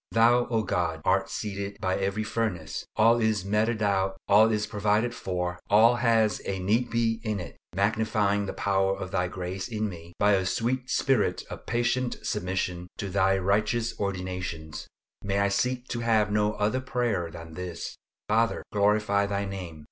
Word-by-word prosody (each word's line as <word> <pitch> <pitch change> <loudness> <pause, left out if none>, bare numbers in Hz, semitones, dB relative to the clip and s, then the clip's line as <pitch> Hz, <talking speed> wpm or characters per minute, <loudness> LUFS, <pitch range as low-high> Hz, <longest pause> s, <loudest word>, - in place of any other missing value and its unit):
Thou, 120 +2 +4
O 115 -2 0
God, 85 -5 -1
art - - +2
seated 100 -1 -4
by 95 0 0
every 100 +2 -1
furnace; 100 -9 -3
all 115 +2 +5
is 110 -4 +1
meted 105 +2 +1
out, 95 -1 +1
all 110 +3 +6
is 105 -1 0
provided 105 +3 +1
for; 90 -3 -3
all 115 +4 +6
has 115 -3 +2
a 95 - -2
"need 110 +6 +1
be" 115 -1 0
in 110 -3 -1
it! 90 - -8 0.2
Magnify 105 0 +1
the - - -4
power 95 -1 +1
of 95 - -6
Thy 90 -2 +1
grace 90 +1 -5
in 110 -2 -2
me, 85 -2 -10
by 105 0 +4
a 95 -2 +3
sweet 125 +5 -1
spirit 130 -6 +1
of - - -9
patient 120 +1 0
submission 90 -3 -2
to 100 - -4
Thy 95 0 +3
righteous 105 +5 +1
ordinations. 90 -5 -4 0.4
May 100 0 -1
I 100 0 +3
seek 125 +5 -1
to 120 - -2
have 110 -3 +2
no 105 0 +2
other 110 +6 0
prayer 120 -9 -1
than 80 -1 -10
this, 90 0 -6 0.3
"Father, 115 +2 +1
glorify 100 0 +2
Thy 100 0 -1
name." 90 -5 -6
105 Hz, 170 wpm, -27 LUFS, 95-115 Hz, 0.4 s, all